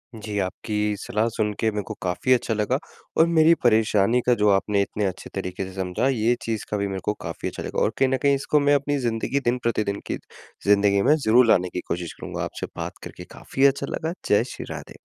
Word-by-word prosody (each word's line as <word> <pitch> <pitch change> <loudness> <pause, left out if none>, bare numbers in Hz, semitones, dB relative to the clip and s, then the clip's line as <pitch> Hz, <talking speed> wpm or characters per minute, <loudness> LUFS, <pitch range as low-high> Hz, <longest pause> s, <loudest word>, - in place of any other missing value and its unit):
जी, 105 -1 -5
आपकी 105 +2 -2
सलाह 110 +2 -1
सुन 105 -1 0
के 110 - +2
मेरे 105 0 -3
को - - -6
काफ़ी 90 +8 +1
अच्छा 120 -2 0
लगा। 110 +4 0 0.4
और 165 - +6
मेरी 165 0 +5
परेशानी 110 -1 +3
का 125 - +4
जो 105 - +5
आपने 100 +1 +2
इतने 105 +1 -2
अच्छे 95 -1 -4
तरीके 95 0 -3
से 95 - -9
समझा, 95 +6 -1
ये 120 -2 +2
चीज़ 110 -3 -3
का 105 - 0
भी 100 0 -1
मेरे 95 -1 -4
को 105 - +1
काफ़ी - - -5
अच्छा - - -7
लगा। - - -3
और 110 - +2
कहीं 135 -1 +3
न 130 - +1
कहीं 140 -1 +4
इसको 145 +2 +1
मैं 145 0 +4
अपनी 145 +1 0
ज़िंदगी 115 +4 -1
दिन 120 +1 +2
प्रतिदिन 105 -3 0
की - - -2 0.5
ज़िंदगी 100 -1 +4
में 150 - +7
ज़रूर 125 -4 +4
लाने 90 -4 +3
की 90 - -2
कोशिश 85 -1 -3
करूँगा। - - -5
आपसे - - -5
बात - - -5
करके - - -9
काफ़ी 135 - -1
अच्छा 140 0 +2
लगा। 160 +1 -3 0.2
जय 105 +2 +4
श्री - - -7
राधे। - - -8
110 Hz, 225 wpm, -24 LUFS, 100-130 Hz, 0.5 s, में